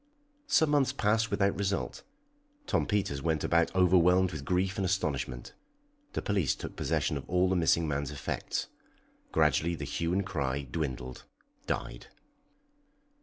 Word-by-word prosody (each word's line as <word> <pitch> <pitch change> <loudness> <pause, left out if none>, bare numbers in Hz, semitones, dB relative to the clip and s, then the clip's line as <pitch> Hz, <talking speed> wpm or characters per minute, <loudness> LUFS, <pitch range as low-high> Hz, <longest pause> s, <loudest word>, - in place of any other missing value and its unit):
Some 160 - +3
months 135 -3 +3
passed 110 -2 +1
without 100 0 +1
result. 100 -1 -2 0.6
Tom - - 0
Peters 95 -9 0
went 80 -1 0
about 85 -1 +2
overwhelmed 90 0 +4
with 80 -4 -6
grief 95 +1 0
and 100 - 0
astonishment. 70 -10 -2 0.6
The - - -3
police 95 -9 +1
took - - -7
possession - - 0
of - - -9
all 90 +1 +3
the 95 - +2
missing 85 -1 +3
man's 70 -1 -2
effects. 75 -1 -3 0.7
Gradually 85 +2 +2
the 75 - -5
hue 85 +4 -2
and 95 +1 +1
cry 70 -6 -2
dwindled, 65 -3 -5 0.4
died. - - -4
85 Hz, 140 wpm, -30 LUFS, 70-95 Hz, 0.7 s, overwhelmed